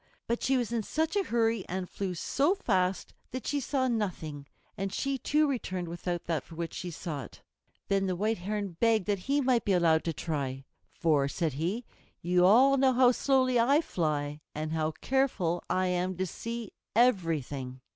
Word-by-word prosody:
But 235 +1 -1
she 265 0 +2
was 240 -2 -1
in 235 -1 0
such 320 - -1
a 400 - +2
hurry 225 -3 +1
and 185 0 -3
flew 190 -1 -4
so 285 - +1
fast 190 - 0 0.2
that 255 0 -6
she 290 - 0
saw 265 0 0
nothing, 170 - -3 0.3
and 195 -1 -3
she 275 +5 -1
too 300 +4 +2
returned 185 -10 -3
without 175 +1 -3
that 160 -5 -2
for 165 - -13
which 165 0 -4
she 180 - -5
sought. 155 - -6 0.5
Then 195 -1 +1
the 185 - 0
White 215 +3 0
Heron 200 -1 -3
begged 225 -4 +3
that 205 -2 0
he 285 +1 +3
might 250 -3 +2
be 200 - +1
allowed 165 -3 +3
to 165 - 0
try. 140 -4 -3 0.3
"For," 150 -4 +1
said 160 +1 -1
he, 180 - -2 0.3
"you 180 +1 +3
all 265 +7 +6
know 265 -1 +4
how 250 0 +6
slowly 255 -1 +2
I 275 +6 +4
fly, 150 - -2
and 155 +1 -3
how 155 -1 0
careful 245 -11 +1
I 185 0 +1
am 180 0 -1
to 185 - 0
see 230 +4 -6 0.2
everything." 155 - +1
190 Hz, 185 wpm, -29 LUFS, 165-245 Hz, 0.5 s, all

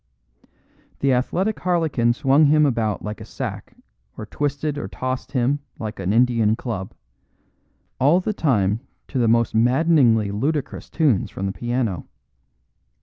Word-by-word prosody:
The 135 -1 +3
athletic 185 +12 0
harlequin 160 -10 +1
swung 140 +3 +3
him 150 +1 +4
about 115 -6 -1
like 105 +1 -6
a - - -6
sack - - -7 0.4
or 110 - -6
twisted 145 +4 -2
or - - -5
tossed 130 +1 -5
him 130 +2 +1 0.2
like 110 -2 -6
an 95 0 -1
Indian 115 -2 +3
club; 110 -6 -5 1.0
all 145 +7 +4
the 210 +3 -2
time 110 - +1 0.3
to 135 - -2
the 120 - +2
most 115 +1 +2
maddeningly 120 -3 +3
ludicrous 140 +7 -3
tunes 140 - +1
from 95 - -5
the 95 - -1
piano. 120 -4 -2
125 Hz, 140 wpm, -22 LUFS, 110-145 Hz, 1.0 s, him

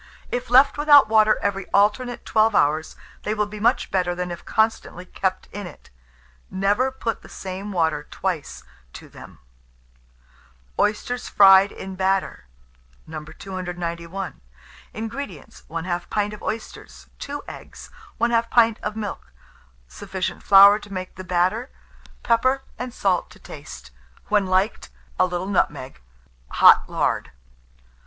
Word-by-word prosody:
If 245 0 -3
left 270 +4 +5
without 290 -4 +7
water 215 -1 +4
every 195 -1 -2
alternate 235 +5 +1
12 220 -1 +2
hours, 155 +2 +1 0.3
they 215 - -2
will 210 0 0
be 210 +1 -9
much 235 +5 +1
better 180 -2 0
than 180 0 -4
if 170 - -8
constantly 220 -5 -1
kept 185 0 -3
in 205 -2 -6
it. 165 - -15 0.6
Never 200 +7 +1
put 235 -3 -4
the - - -15
same 190 +2 -7
water 160 -5 -1
twice 180 -6 -4 0.3
to - - -11
them. - - -14 1.4
OYSTERS 245 +4 -1
FRIED 195 0 +7
IN 190 - -8
BATTER. 190 - -1 0.6
291. 175 +2 -6 0.5
INGREDIENTS. 220 - -7
1/2 175 +2 -4
pint 210 0 -1
of 210 - -10
oysters, 220 +1 -7
2 285 0 -6
eggs, - - -11 0.3
1/2 230 0 +1
pint 230 -2 +3
of 210 0 -4
milk, 205 - -6 0.6
sufficient 190 - -5
flour 200 +1 +7
to 205 -1 -14
make 185 -1 -6
the 185 - -9
batter; 185 +7 0 0.5
pepper 255 +3 +2 0.2
and 250 0 -5
salt 190 -5 0
to - - -16
taste; - - -11 0.4
when 205 -2 +2
liked, 190 +4 0 0.3
a 185 - +4
little 180 0 -3
nutmeg; 145 - -2 0.5
hot - - +6
lard. - - -1
195 Hz, 130 wpm, -23 LUFS, 180-225 Hz, 1.4 s, without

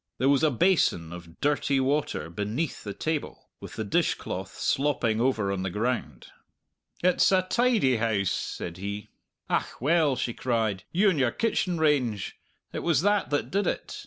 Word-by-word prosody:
There 130 +3 +2
was 140 -1 +4
a 155 - +4
basin 125 - +2
of 85 -1 -11
dirty 140 -1 +1
water 135 - -1
beneath 105 - -3
the 105 - -5
table, 155 -2 -4
with - - -9
the 110 - -3
dishcloth 100 - -2
slopping 125 -6 +1
over 115 -6 +1
on 95 -1 -2
the 95 - -2
ground. 105 - -2 0.8
"It's 180 +1 +4
a 185 -1 +4
tidy 210 - +2
house!" 110 -4 0
said 85 0 -4
he. 100 +2 -5 0.4
"Ach, - - -1
well," 150 0 +3
she 120 - -2
cried, 110 -7 -1
"you 195 +3 +4
and 160 - -1
your 130 -3 +3
kitchen 185 - 0
range! 130 -10 +1 0.4
It - - -2
was 160 -5 +2
that 205 0 +2
that 145 - -1
did 200 +2 +1
it! - - -3
130 Hz, 165 wpm, -27 LUFS, 105-160 Hz, 0.8 s, was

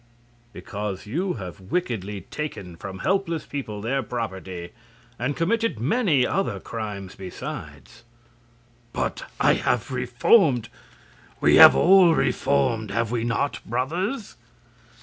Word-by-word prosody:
"Because 100 -3 -6
you 175 - -1
have 90 -7 -8
wickedly 105 - -3
taken 100 - -6
from 95 +2 -8
helpless 190 -4 0
people 110 -8 -5
their 135 +4 0
property, 95 -7 -5 0.5
and 130 +4 -1
committed 225 - 0
many 150 - +2
other 125 - -1
crimes 100 -3 -6
besides." 95 +4 -8 0.9
"But - - -3
I - - +5
have 125 +1 -1
reformed! 125 - +3 0.7
We - - +5
have - - +10
all 180 -2 +6
reformed 130 -6 +1
have 115 +3 -1
we 120 -2 -1
not, 120 +5 -1
brothers?" 175 - -3
120 Hz, 110 wpm, -24 LUFS, 105-160 Hz, 0.9 s, have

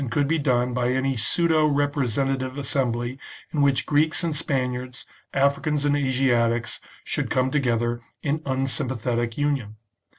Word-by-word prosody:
XVll 135 - -2
could 140 +4 +1
be 165 +2 +1
done 125 -3 +1
by 125 0 +1
any 130 +1 +1
pseudo 155 +6 +2
representative 135 -2 0
assembly 130 -2 -1 0.3
in 150 - +1
which 140 -2 +3
Greeks 155 +3 +2
and 165 -3 -1
Spaniards, 125 -3 -2 0.3
Africans 140 +2 +1
and 145 0 +3
Asiatics 125 -4 +1 0.2
should - - -2
come 130 0 +1
together 120 -4 0 0.2
in 150 +2 0
unsympathetic 130 -4 -1
union. 140 -8 -1
135 Hz, 135 wpm, -24 LUFS, 125-145 Hz, 0.3 s, which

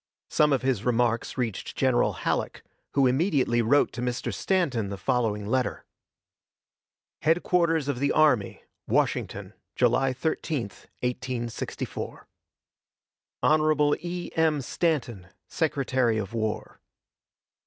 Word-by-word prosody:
Some 150 0 +4
of 135 -2 +1
his 130 -6 0
remarks 120 0 0
reached 115 -6 -3
General 130 -2 +2
Halleck, - - -2 0.3
who 140 -1 +4
immediately 130 -3 +2
wrote 130 +6 +3
to 120 - -5
Mr. 125 0 -2
Stanton 135 - 0
the 100 - -5
following 105 0 0
letter: 130 +4 -1 1.4
HEADQUARTERS 165 -1 +2
OF 140 -4 -1
THE 140 +1 +1
ARMY, 145 -10 +2 0.2
WASHINGTON, - - -1 0.2
July 135 -1 +3
13, 155 +1 -2 0.4
1864. 125 -2 -4 1.2
Hon. 155 -1 +3
E. 175 +1 -5
M. 160 -3 +2
STANTON, 125 - -1 0.2
Secretary 130 -7 0
of 105 0 -4
War. 110 -2 -3
130 Hz, 105 wpm, -26 LUFS, 120-155 Hz, 1.4 s, Some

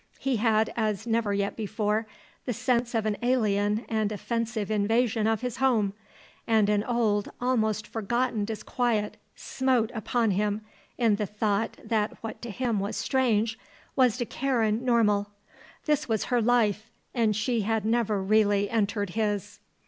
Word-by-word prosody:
He 270 -3 0
had, 220 0 +2
as 215 -2 -1
never 225 -2 +1
yet 200 0 -1
before, 215 0 -1 0.4
the 245 - 0
sense 240 0 0
of 220 -1 +1
an 210 -1 0
alien 215 -3 +1
and 215 -2 0
offensive 225 0 -2
invasion 220 +1 +2
of 225 -1 +1
his 250 -1 -3
home, 230 -7 +2 0.5
and 220 -3 +3
an 210 -1 +2
old, 220 -4 +1
almost 220 -4 0
forgotten 230 +1 -1
disquiet 220 0 -1 0.2
smote 255 -4 0
upon 225 0 0
him 205 +2 0 0.4
in 225 -4 +3
the 210 -1 -2
thought 210 +1 -1
that 215 -2 -1
what 225 - -6
to 240 - -6
him 235 -1 -1
was 200 +2 -3
strange 230 -3 +1 0.4
was 250 -3 +3
to 240 - -1
Karen 230 -4 0
normal. 210 -5 +2 0.6
This 300 -4 0
was 220 -2 +1
her 240 - +4
life 225 -2 +2 0.2
and 225 -4 +2
she 225 +2 0
had 220 0 0
never 220 -3 +1
really 205 0 +3
entered 205 -3 0
his. 210 -1 -2
220 Hz, 150 wpm, -27 LUFS, 210-240 Hz, 0.6 s, her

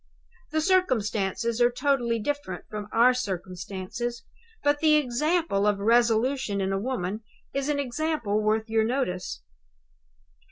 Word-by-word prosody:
The 315 +1 0
circumstances 235 - +1
are 240 - +6
totally 245 -2 +1
different 225 -6 -4
from 210 -1 -6
our 240 +3 +5
circumstances; 195 +2 -4 0.4
but 290 0 +2
the 310 -1 +5
example 300 - +1
of 205 -1 +2
resolution 230 +1 +2
in 195 0 0
a 195 - 0
woman 210 -3 -3 0.3
is 275 +1 -1
an 295 - +1
example 260 -5 -1
worth 220 +1 +1
your 220 0 +2
notice. 185 - -2
235 Hz, 125 wpm, -26 LUFS, 205-275 Hz, 0.4 s, are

